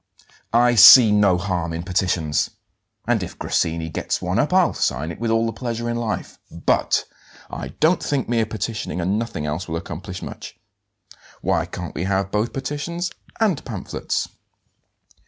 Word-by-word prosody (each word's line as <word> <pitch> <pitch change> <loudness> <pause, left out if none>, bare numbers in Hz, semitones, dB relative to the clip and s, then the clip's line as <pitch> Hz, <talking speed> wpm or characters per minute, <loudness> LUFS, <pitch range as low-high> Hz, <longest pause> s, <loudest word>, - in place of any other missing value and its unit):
"I 120 +1 +5
see 115 +1 +10
no 100 -3 +4
harm 90 -3 -2
in 85 +1 -4
petitions, 90 -4 0 0.6
and - - +1
if - - -7
Grassini 80 0 -1
gets 80 - -2
one 90 +4 -1
up 145 - +1
I'll 185 -2 +4
sign 75 +5 -1
it 80 - -9
with 115 0 -1
all 115 0 +2
the 115 - -2
pleasure 120 0 -4
in 120 - -1
life. 115 -2 -4
But 85 - +1 0.5
I - - -5
don't 160 +3 +3
think 140 -3 -1
mere 115 -2 +1
petitioning 110 -3 -4
and 95 +5 0
nothing 115 -10 -4
else 75 +4 -3
will 80 0 -2
accomplish 90 +1 -7
much. - - -8 0.8
Why - - 0
can't - - -7
we 85 - -3
have 95 0 0
both 105 +3 0
petitions 150 +6 -4 0.3
and 210 -9 +1
pamphlets?" 105 -7 -3
105 Hz, 160 wpm, -22 LUFS, 90-120 Hz, 0.8 s, see